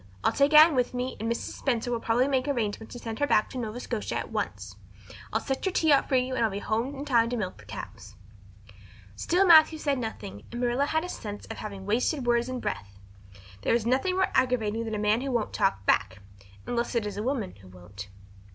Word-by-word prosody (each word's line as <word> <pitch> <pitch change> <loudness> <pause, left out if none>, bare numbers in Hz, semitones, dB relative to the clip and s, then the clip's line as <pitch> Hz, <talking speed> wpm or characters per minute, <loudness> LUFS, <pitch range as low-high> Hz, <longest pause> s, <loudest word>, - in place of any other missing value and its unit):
I'll - - +3
take 285 +2 +3
Anne 310 +1 +9
with 250 -1 0
me 250 +1 -3
and 225 +2 -2
Mrs. 235 - -3
Spencer 245 -2 -1
will 235 - 0
probably 235 +3 +2
make 265 -1 0
arrangements 220 -5 -2
to - - -7
send 225 -2 -6
her 290 - +2
back 215 - +2
to 260 - -5
Nova 225 0 -4
Scotia 235 -3 -4
at - - -4
once. - - -4 0.6
I'll - - +1
set 270 -1 -3
your 380 - 0
tea 320 -4 +3
out 280 - +4
for 265 - +2
you 255 0 +1
and 245 - 0
I'll 225 - +3
be 195 - -5
home 230 +7 -2
in 275 +1 -6
time 235 -5 +3
to 245 - -2
milk 185 - -4
the 105 - -15
cows." 105 +1 -9 1.0
Still 355 - +2
Matthew 320 -2 +7
said 285 -3 -1
nothing 105 - -6
and 240 - -5
Marilla 250 +3 +1
had 315 +1 0
a - - -4
sense 205 -9 -7
of - - -7
having 200 -2 -7
wasted 245 +6 0
words 240 +1 +2
and 255 -1 -3
breath. 100 - -5 0.6
There - - +2
is 235 -2 0
nothing 265 +10 +1
more 380 0 +1
aggravating 230 -3 +1
than 220 -1 -3
a - - -2
man 210 +3 +2
who 275 - -3
won't 235 -4 -1
talk 150 - 0
back - - +2 0.5
unless 240 0 -2
it 230 -3 +1
is 205 -1 -4
a - - -2
woman 230 - -2
who 95 -1 -16
won't. 95 +2 -11
240 Hz, 235 wpm, -27 LUFS, 215-270 Hz, 1.0 s, Anne